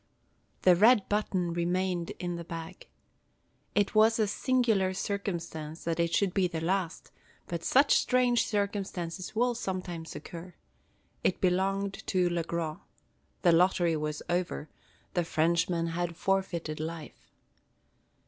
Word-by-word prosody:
The 180 -1 +7
red 215 +3 +5
button 190 -4 0
remained 175 0 -1
in 175 -1 -3
the 170 - -5
bag. 165 - -8 0.9
It 205 -1 +2
was 220 +1 +5
a 220 - +3
singular 215 -4 +1
circumstance 170 -6 -4
that 165 0 -2
it 170 0 +1
should 195 0 +1
be 190 -2 +2
the 165 -2 -4
last; 175 0 -2 0.3
but 170 -1 -5
such 275 - +4
strange 250 -2 +2
circumstances 195 -3 -3
will 245 +2 +2
sometimes 185 -7 -5
occur. 175 0 -9 0.7
It 185 - +1
belonged 195 +2 0
to 185 -2 +2
Le 170 -1 0
Gros. 165 -1 -3 0.6
The 175 - +6
lottery 175 -1 +3
was 150 0 -3
over; 175 -3 -2 0.4
the 175 - +1
Frenchman 165 +1 +1
had 170 0 -3
forfeited 175 -5 -1
life. 160 0 -7
180 Hz, 130 wpm, -29 LUFS, 170-200 Hz, 0.9 s, The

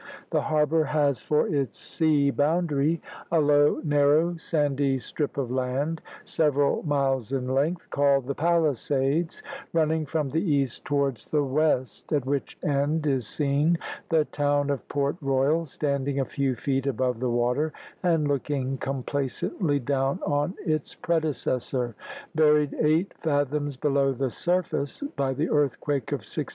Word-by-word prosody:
The - - +2
harbour 155 0 +2
has 145 -2 +1
for 150 0 +1
its 135 -8 -1
sea 150 -3 +2
boundary 155 +1 +1 0.3
a 165 - +4
low, 145 0 +4
narrow, 150 +3 +3
sandy 145 -4 0
strip 145 +3 -4
of 130 -3 -2
land, 130 +5 -1 0.2
several 145 -3 +1
miles 135 -5 0
in 130 -2 -1
length, 145 +7 0
called 140 -2 +3
the 140 - -2
Palisades, 155 -1 0 0.3
running 160 -1 +1
from 150 -2 -1
the 160 +5 0
east 140 - 0
towards 140 -5 0
the 150 -1 +1
west; 140 -2 0
at 145 -4 +1
which 140 0 -2
end 145 +2 +1
is 135 -6 0
seen 150 +3 +1 0.3
the 160 -3 +3
town 145 -1 0
of 140 - -4
Port 140 +2 -1
Royal 140 +4 +1
standing 140 -1 -1
a 135 - +1
few 135 -1 -1
feet 135 +3 -1
above 125 -2 0
the 125 0 0
water, 125 +6 +1 0.3
and 165 -4 +2
looking 135 -1 -1
complacently 140 - -1
down 135 +4 0
on 145 +4 0
its 155 -4 -1
predecessor, 130 -6 -1 0.4
buried 150 -2 +4
eight 160 +5 +2
fathoms 145 -2 0
below 140 -1 +2
the 130 0 -2
surface 175 - -1
by 135 -1 0
the 145 +5 -1
earthquake 145 -2 0
of - - -1
1692. - - -4
145 Hz, 140 wpm, -26 LUFS, 135-155 Hz, 0.4 s, a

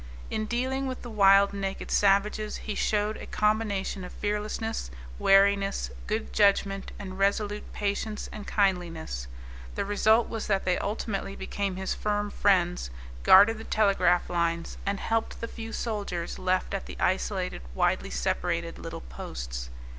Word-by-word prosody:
In 215 - -1
dealing 260 +3 -1
with 255 -1 -5
the 240 - -7
wild, 200 -1 +6
naked 195 -1 -4
savages 205 +2 +2
he 215 - -2
showed 210 +1 0
a - - -9
combination 210 -3 0
of 180 - -7
fearlessness, 210 - -3 0.3
wariness, 195 0 +4 0.2
good 215 +1 -2
judgment, 195 -1 +2
and 190 -1 -7
resolute 205 +1 0
patience 205 +1 -2
and 210 - -8
kindliness. 170 - 0 0.5
The - - -1
result 220 +3 +3
was 225 -1 -4
that 195 -2 +1
they 180 -1 +2
ultimately 200 -1 -3
became 195 0 -3
his 190 0 -2
firm 205 0 -1
friends, 180 - +2 0.3
guarded 205 - +7
the - - -7
telegraph 195 -5 +3
lines, 170 -1 -1
and 200 0 0
helped 225 0 -1
the 230 - -4
few 225 -1 -7
soldiers 200 -8 -3
left 185 +1 0
at 195 - -3
the - - -8
isolated, 185 - 0
widely - - +1
separated 60 0 -1
little - - -6
posts. - - -6
200 Hz, 145 wpm, -28 LUFS, 185-215 Hz, 0.5 s, guarded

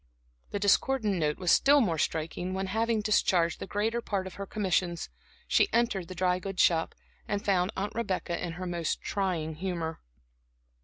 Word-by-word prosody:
The - - -3
discordant 205 +1 +2
note 150 -2 0
was 180 -2 +1
still 285 +1 +6
more 175 - +1
striking 165 +4 -2
when, 190 0 -1
having 220 +3 0
discharged 185 -5 +2
the - - -6
greater 225 +4 -1
part 200 -4 -2
of 190 - -7
her 200 0 -6
commissions, 180 -4 -1 0.4
she 400 - +3
entered 230 -7 +1
the 185 - -8
dry 180 0 +1
goods 195 0 0
shop, 165 -1 +2 0.3
and 205 -1 -2
found 185 -1 +2
Aunt 200 +2 -2
Rebecca 190 -6 -2
in 170 -2 -3
her 185 +2 -6
most 170 -3 -2
trying 180 -6 -1
humor. 170 -3 -3
190 Hz, 170 wpm, -29 LUFS, 175-205 Hz, 0.4 s, still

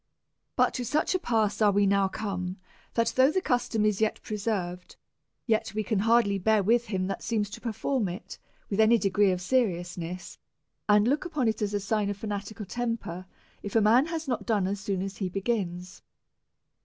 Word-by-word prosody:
But - - +3
to 250 - -3
such 300 - 0
a 370 - +1
pass 220 - 0
are 210 -1 +5
we 200 0 +3
now 200 0 +3
come^ 190 -3 -4 0.4
that 230 -1 +1
though 260 +1 +6
the 375 - +1
custom 245 - 0
is 210 -1 +1
yet 220 - +1
preserved, 200 -4 -3 0.5
yet 220 -3 0
we 215 - 0
can 210 -1 0
hardly 225 -2 +3
bear 215 +1 +3
with 235 +4 +3
him 190 -3 -1
that 195 - -4
seems 210 -3 -1
to - - -8
perform 235 0 -1
it 180 +5 -8 0.3
with 200 - -3
any 220 +2 +6
degree 200 -1 +2
of 180 -1 -1
seriousness^ 180 -5 -2 0.5
and 210 +1 +5
look 285 +4 +1
upon 305 -9 -1
it 220 -1 -1
as 205 0 -1
a - - +1
sign 205 0 0
of 205 - -3
fanatical 210 0 -5
tem 235 +2 -2
per, 185 -3 -8 0.3
if 205 - -7
a - - +6
man 235 +8 +5
has 325 -2 -4
not 250 - -2
finished 200 -4 +1
as 200 - -3
soon 195 -1 -2
as 195 0 -6
he 190 -3 -2
begins. 185 -3 -3
210 Hz, 195 wpm, -28 LUFS, 195-230 Hz, 0.5 s, though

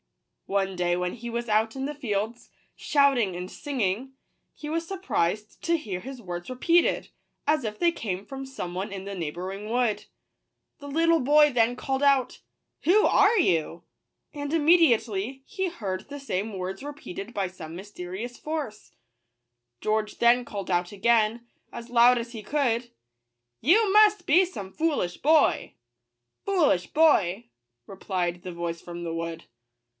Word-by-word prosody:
One 195 -1 0
day 175 0 +1
when 180 0 -2
he 235 0 -7
was 235 +1 -3
out 220 +2 +1
in 265 - -2
the 295 - -3
fields, 225 -4 -3 0.3
shouting 270 - +2
and 180 +1 -6
singing, 255 0 -3 0.4
he 300 - -8
was 330 +2 -2
surprised 215 - -2
to 335 0 +1
hear 200 - -5
his 260 +1 -8
words 175 -1 -6
repeated, 335 +7 +2 0.4
as 305 -2 +2
if 210 -2 -4
they 345 - +4
came 200 - -4
from 270 0 -7
some 180 -10 -6
one 190 +3 -4
in 195 -1 -6
the 200 0 -5
neighbouring 185 +5 -5
wood. 240 -2 0 0.7
The 285 - -9
little 330 +2 +3
boy 295 +2 +5
then 240 +1 +2
called 270 +1 -2
out, 275 -3 +2 0.2
" - - -54
Who 405 +7 +5
are 425 +3 +4
you 170 - +1 0.3
?" - - -54
and 290 -1 -5
immediately 265 - +3
he 380 -3 -2
heard 195 - -5
the 285 0 -7
same 205 -5 -3
words 190 +5 -5
re 290 - -5
peated 210 -5 -8
by 195 -3 -1
some 170 -3 -9
mysterious 195 +4 -7
voice. 300 -9 -5 0.9
George 215 - -1
then 240 +1 +4
called 200 -5 -6
out 175 0 0
again, 230 +2 +1 0.2
as 235 0 -8
loud 245 +1 +6
as 235 0 -4
he 220 -2 -7
could, 245 -4 0 0.4
" 120 0 -56
You 420 0 +5
must 420 -1 +5
be 340 +6 +5
some 200 - -8
foolish 295 - -1
boy." 310 +1 +3 0.3
" 120 0 -56
Fool 375 -6 +3
ish 180 -1 0
boy!" 235 - +3 0.4
replied 180 -2 -3
the 180 - -7
voice 170 -1 -4
from 175 0 -8
the 165 - -3
wood. 165 0 -5
230 Hz, 165 wpm, -26 LUFS, 185-285 Hz, 0.9 s, loud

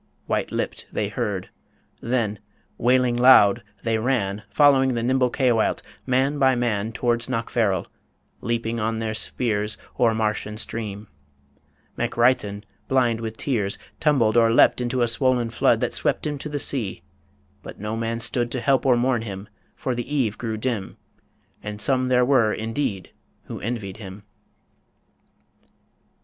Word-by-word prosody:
White - - -1
lipped - - -3
they - - -1
heard.... - - -3 0.5
Then, 115 -4 -1 0.4
wailing 125 0 +3
loud, 120 -4 +6 0.2
they 115 -1 0
ran, 110 -5 0
Following 135 -3 +4
the 115 - -1
nimble 130 +1 +2
Caoilte, 120 -4 +1 0.2
man 135 +3 +1
by 130 -1 +4
man, 115 -3 -1
Towards 120 0 0
Knockfarrel; 115 -6 0 0.6
leaping 115 0 -2
on 110 +1 -1
their 110 -1 -2
spears 110 -2 -2 0.2
O'er 115 -2 +3
marsh 110 -1 -1
and 105 0 -6
stream. 105 -2 -4 0.9
MacReithin, 110 -4 +1 0.2
blind 120 -4 +2
with 110 -1 -5
tears, 105 -8 -1 0.2
Tumbled 125 -8 +3
or 115 -1 +5
leapt 120 - +5
into 125 0 0
a - - +2
swollen 120 0 +1
flood - - +2
That - - -1
swept - - -1
him 145 -2 -3
to 150 - -6
the 145 - -3
sea. 125 -8 -1 0.6
But - - -10
no 105 +2 -3
man 115 0 -2
stood 120 +1 -1
To 130 - -1
help 135 +1 +2
or 125 -2 +5
mourn 120 -1 +1
him, 100 -2 -7 0.3
for 130 - -2
the 120 +3 -5
eve 115 -7 +1
grew 110 -2 -4
dim 110 -4 -3 0.6
And 105 0 -6
some 130 +3 +1
there 125 -1 +3
were, 120 -5 +3
indeed, 110 -3 -3 0.3
who - - -7
envied 105 -3 -4
him. 100 -1 -10
115 Hz, 150 wpm, -23 LUFS, 110-130 Hz, 0.9 s, loud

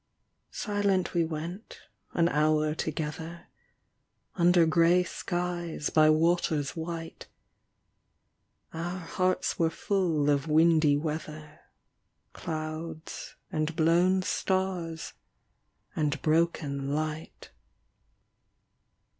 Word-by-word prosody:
Silent 200 -3 0
we 170 - +2
went 165 +6 -6 0.3
an 170 -1 +3
hour 155 0 +2
together, 160 +2 -4 0.9
Under 175 -1 +4
grey 170 +2 +4
skies 175 -3 -3
by 155 -1 +5
waters 155 -2 +2
white. 165 0 -6 1.5
Our 170 +3 -4
hearts 185 +1 -1
were 165 -1 +3
full 165 -5 0
of 140 +1 0
windy 155 -2 +4
weather. 155 0 -5 0.7
Clouds 155 0 -6 0.2
and 155 +1 -1
blown 175 +4 +3
stars 185 -4 -2 0.8
and 150 -1 0
broken 150 -4 0
light. 155 +1 -5
165 Hz, 80 wpm, -28 LUFS, 155-175 Hz, 1.5 s, by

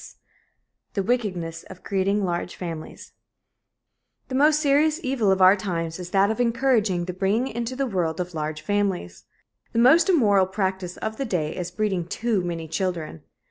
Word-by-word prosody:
CHAPTER - - -13
V - - -42
THE 195 - -1
WICKEDNESS 185 -8 -2
OF 185 -1 -12
CREATING 195 +1 0
LARGE 175 0 -3
FAMILIES 165 -3 -7 1.2
The - - -6
most 300 +3 +4
serious 305 +2 +3
evil 255 -7 +1
of 190 -1 +3
our 185 +2 +8
times 170 -4 -3
is 180 -1 -6
that 195 +2 +3
of 220 - -4
encouraging 230 -7 +1
the 180 - -4
bringing 200 +7 0
into 235 +2 -4
the 275 +1 0
world 175 -8 -1
of 180 0 -4
large 155 0 -4
families. 195 - -2 0.5
The - - -2
most 270 +11 +6
immoral 205 - +4
practice 190 -2 -3
of 220 0 -4
the 275 - -2
day 170 -9 -2
is 175 -1 -4
breeding 190 -3 -2
too 220 +1 0
many 165 -2 -4
children. 165 - -3
195 Hz, 175 wpm, -24 LUFS, 175-230 Hz, 1.2 s, our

